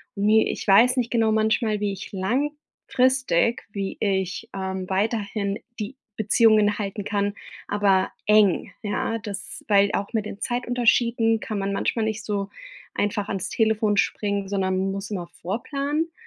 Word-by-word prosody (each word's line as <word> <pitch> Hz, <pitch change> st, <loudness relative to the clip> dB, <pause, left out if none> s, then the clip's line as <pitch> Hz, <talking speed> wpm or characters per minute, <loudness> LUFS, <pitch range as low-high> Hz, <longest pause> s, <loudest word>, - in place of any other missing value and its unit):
Ne, 215 Hz, +2 st, +3 dB
ich -, -, -4 dB
weiß 235 Hz, +6 st, +6 dB
nicht 240 Hz, -2 st, 0 dB
genau 225 Hz, -2 st, +3 dB
manchmal, 220 Hz, 0 st, +1 dB
wie 205 Hz, -, 0 dB
ich 195 Hz, -, -8 dB
langfristig 255 Hz, -, 0 dB
wie 195 Hz, -1 st, -3 dB
ich, 190 Hz, +1 st, -1 dB
ähm, 190 Hz, -1 st, -4 dB
weiterhin 200 Hz, 0 st, -1 dB, 0.2 s
die 235 Hz, +6 st, -5 dB, 0.2 s
Beziehungen 215 Hz, -1 st, +4 dB
halten 200 Hz, 0 st, -3 dB
kann, 205 Hz, -1 st, 0 dB, 0.3 s
aber 195 Hz, -2 st, +2 dB, 0.2 s
eng. 210 Hz, -4 st, +4 dB
Ja, 215 Hz, +2 st, -1 dB
das 200 Hz, -2 st, -7 dB
weil 200 Hz, -1 st, +5 dB
auch 200 Hz, +3 st, -2 dB
mit 220 Hz, -2 st, 0 dB
den 200 Hz, -, -8 dB
Zeitunterschieden 240 Hz, -2 st, +2 dB
kann 215 Hz, -, -4 dB
man 200 Hz, 0 st, -1 dB
manchmal 220 Hz, +3 st, 0 dB
nicht 220 Hz, 0 st, -3 dB
so 200 Hz, -1 st, -2 dB, 0.5 s
einfach 205 Hz, 0 st, -1 dB
ans 195 Hz, -3 st, -3 dB
Telefon 220 Hz, -2 st, +1 dB
springen, 200 Hz, -1 st, 0 dB
sondern 190 Hz, -1 st, 0 dB
muss 195 Hz, +1 st, -5 dB
immer 185 Hz, -4 st, -3 dB, 0.2 s
vorplanen. 280 Hz, -, -2 dB
210 Hz, 145 wpm, -24 LUFS, 200-225 Hz, 0.5 s, weiß